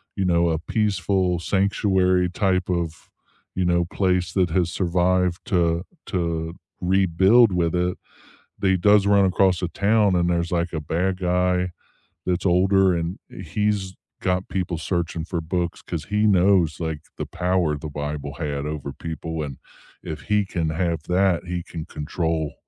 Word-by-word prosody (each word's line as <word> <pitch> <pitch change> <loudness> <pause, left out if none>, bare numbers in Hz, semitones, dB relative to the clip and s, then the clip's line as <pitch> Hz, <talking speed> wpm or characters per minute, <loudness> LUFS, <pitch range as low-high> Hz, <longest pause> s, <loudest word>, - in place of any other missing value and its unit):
you 95 - -1
know, 85 -1 +3
a 80 -1 0
peaceful 95 -2 0
sanctuary 95 -1 +2
type 95 -1 0
of, 85 -3 -3 0.5
you 90 -1 0
know, 85 0 +2
place 90 0 0
that 90 -3 +2
has 90 -1 +1
survived 90 0 +1
to 85 -5 +1 0.2
to 85 -3 -2 0.3
rebuild 95 +5 +4
with 85 -1 +1
it. 90 +1 0 0.7
He 95 -1 +3
does 100 +2 +4
run 100 -1 +5
across 95 -1 +2
the 90 - -1
town 100 +1 +2
and 85 0 +2
there's, 85 -1 0
like, 85 0 0
a 80 - -2
bad 90 +5 -1
guy 90 0 +1 0.6
that's 90 +1 0
older 95 +1 +4
and 85 +2 -3
he's 105 -3 -2 0.3
got 90 +1 -1
people 90 -3 -2
searching 85 -1 -2
for 85 0 -3
books 85 +1 -3
'cause 85 -3 -5
he 105 +1 +1
knows, 90 -5 +3
like, 80 -2 -3 0.2
the - - -4
power 90 -4 0
the 75 - -6
Bible 75 -1 -5
had 75 -3 -3
over 75 -2 -4
people 80 +1 -5
and 70 -3 -6 0.4
if 80 - -6
he 105 -1 +1
can 80 -4 -2
have 85 -1 -1
that, 90 -1 +1
he 90 0 -3
can 80 -2 -7
control 80 0 -2
90 Hz, 155 wpm, -23 LUFS, 85-95 Hz, 0.7 s, run